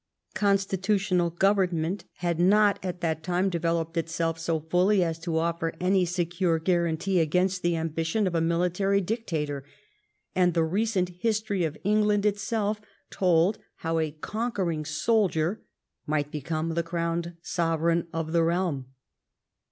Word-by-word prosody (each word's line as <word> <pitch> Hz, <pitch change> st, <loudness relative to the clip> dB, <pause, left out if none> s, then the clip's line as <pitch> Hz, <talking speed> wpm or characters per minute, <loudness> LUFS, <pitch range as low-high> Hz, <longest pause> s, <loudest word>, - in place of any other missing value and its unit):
Constitutional 195 Hz, -2 st, +1 dB
government 185 Hz, -1 st, +1 dB
had 170 Hz, -2 st, -2 dB
not 205 Hz, +3 st, +4 dB
at 180 Hz, -1 st, -4 dB
that 160 Hz, -2 st, -1 dB
time 180 Hz, +3 st, 0 dB
devel 170 Hz, -1 st, 0 dB
oped 165 Hz, +1 st, -8 dB
itself 165 Hz, 0 st, -1 dB
so 165 Hz, 0 st, 0 dB
fully 180 Hz, +5 st, +2 dB
as 165 Hz, -1 st, -2 dB
to 165 Hz, -1 st, -2 dB
offer 165 Hz, 0 st, -1 dB
any 185 Hz, 0 st, +3 dB
secure 175 Hz, 0 st, 0 dB
guarantee 170 Hz, +2 st, +1 dB
against 180 Hz, +3 st, +1 dB
the 175 Hz, -1 st, +1 dB
ambition 165 Hz, +5 st, -1 dB
of 185 Hz, -, -1 dB
a 165 Hz, -, +1 dB
military 180 Hz, +4 st, +1 dB
dictator, 165 Hz, -, -3 dB, 0.7 s
and 180 Hz, -2 st, +3 dB
the 165 Hz, -, +3 dB
recent 190 Hz, +2 st, 0 dB
history 215 Hz, -4 st, 0 dB
of 155 Hz, -1 st, -4 dB
England 210 Hz, 0 st, +2 dB
itself 210 Hz, +1 st, 0 dB, 0.3 s
told 180 Hz, +2 st, +2 dB, 0.2 s
how 165 Hz, 0 st, -1 dB
a 160 Hz, -1 st, 0 dB
conquering 175 Hz, -1 st, -3 dB
soldier 185 Hz, +1 st, +1 dB, 0.5 s
might 150 Hz, -1 st, -1 dB
become 155 Hz, +2 st, -2 dB
the 170 Hz, -, +1 dB
crowned 170 Hz, 0 st, -2 dB
sovereign 165 Hz, 0 st, 0 dB
of 160 Hz, -1 st, -3 dB
the 170 Hz, 0 st, +3 dB
realm. 165 Hz, -5 st, 0 dB
175 Hz, 135 wpm, -27 LUFS, 165-195 Hz, 0.7 s, not